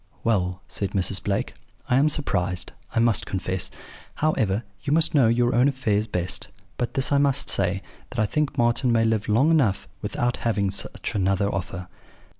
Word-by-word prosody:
"'Well,' 90 -5 0
said 100 -1 -3
Mrs. 95 0 0
Blake, 100 -1 -1 0.3
'I 125 - +3
am 145 +3 +4
surprised, 90 - -1 0.2
I - - -1
must 115 -1 +3
confess. 95 -1 -2 0.5
However, 115 -9 +1 0.2
you 140 - -3
must 165 +2 +3
know 135 -6 +5
your 120 +2 +2
own 125 +3 +4
affairs 110 -6 0
best; 90 -4 -2 0.3
but 120 - -3
this 135 0 +1
I 140 - +4
must 140 -2 +2
say, 95 0 +1 0.3
that 125 - -9
I 110 - +3
think 150 +6 -1
Marten 120 +1 +2
may 115 -1 +3
live 110 -1 0
long 130 +10 +4
enough 105 -11 +2
without 120 +3 -1
having 100 -4 0
such 100 +3 -4
another 100 0 +1
offer.' 90 -1 -4
110 Hz, 175 wpm, -24 LUFS, 95-130 Hz, 0.5 s, know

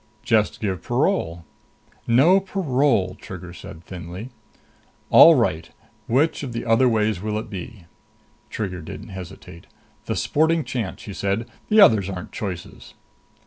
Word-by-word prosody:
"Just 110 -3 +1
give 95 -5 -2
parole." 85 0 -1 0.6
"No 145 +12 +5
parole," 140 - 0
Trigger 90 -2 -9
said 85 -1 -11
thinly. 90 +7 -8 0.8
"All - - +9
right. - - 0 0.4
Which 140 +7 +1
of 130 -5 -5
the 115 - -4
other 115 +3 +4
ways 110 -4 0
will 105 0 -2
it 110 - -6
be?" 95 0 -8 0.6
Trigger 95 -5 -4
didn't 100 +7 -9
hesitate. 95 -2 -10 0.4
"The 110 - -1
sporting 160 +1 +1
chance," 115 -9 -4
she 110 -4 -8
said. 100 +5 -2 0.2
"The 215 0 +6
others 105 - +5
aren't 90 -2 -7
choices." 90 -5 -7
110 Hz, 135 wpm, -22 LUFS, 95-125 Hz, 0.8 s, All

